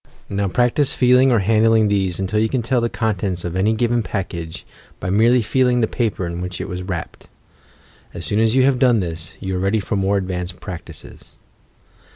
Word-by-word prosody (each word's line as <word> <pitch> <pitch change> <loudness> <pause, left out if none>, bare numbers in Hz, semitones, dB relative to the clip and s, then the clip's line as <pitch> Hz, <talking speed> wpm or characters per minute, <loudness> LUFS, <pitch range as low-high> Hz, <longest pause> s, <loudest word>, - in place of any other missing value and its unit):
Now 100 0 -1
practise 125 +7 +2
feeling 125 +1 +4
or 115 -4 +3
handling 110 0 +4
these 95 -4 0
until 95 +2 0
you 110 +1 +1
can 125 -1 -1
tell 125 +1 +1
the 120 - 0
contents 100 -7 -2
of 85 0 -4
any 105 +4 +2
given 120 +1 +1
package 85 -6 -5 0.3
by 90 - -3
merely 115 +4 +4
feeling 125 +2 +2
the 110 - +2
paper 110 -7 -2
in 85 +1 -4
which 90 0 -5
it - - -4
is 90 0 -4
wrapped. 90 -3 -6 0.8
As 85 - -7
soon 105 - 0
as 115 +1 +2
you 130 - +5
have 130 -1 +2
done 125 -4 +4
this, 85 -3 -5
you 95 -1 -3
are - - -1
ready 100 +4 +1
for 100 - -3
more 100 +1 +1
advanced 90 -2 -4
practices. 90 -4 -8
105 Hz, 195 wpm, -20 LUFS, 90-120 Hz, 0.8 s, you